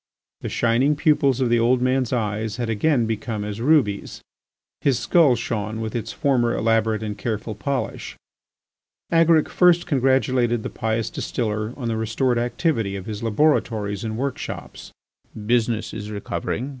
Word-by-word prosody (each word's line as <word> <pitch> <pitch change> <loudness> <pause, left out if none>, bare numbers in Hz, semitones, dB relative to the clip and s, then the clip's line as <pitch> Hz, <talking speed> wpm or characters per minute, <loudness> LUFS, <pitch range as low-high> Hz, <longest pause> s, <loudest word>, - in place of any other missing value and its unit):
The - - -5
shining 120 +6 +2
pupils 140 -4 +2
of 125 - +2
the 120 0 +3
old 120 +2 +3
man's 130 -1 +1
eyes 110 -2 -2
had 120 -2 -2
again 120 +2 +2
become 110 -1 -3
as 105 +1 -5
rubies, 125 -8 +1 0.6
his 135 -4 +2
skull 155 -8 +4
shone 110 -1 -3
with 110 0 -4
its 115 - -3
former 125 -5 +1
elaborate 110 -1 +1
and 105 -1 -4
careful 110 +1 -3
polish. 135 +5 -4 0.9
Agaric 165 -2 +4
first 175 -1 +4
congratulated 130 -5 +1
the - - -5
pious 110 0 -2
distiller 110 -2 -2
on 125 -4 -4
the 115 -1 -1
restored 120 +3 0
activity 120 - -1
of 95 -2 -6
his 105 -2 -5
laboratories 110 -4 +1
and 110 -1 -3
workshops. 135 +1 -5 0.5
"Business 115 -1 0
is 105 -1 -6
recovering. 105 +4 -4
115 Hz, 145 wpm, -22 LUFS, 110-130 Hz, 0.9 s, skull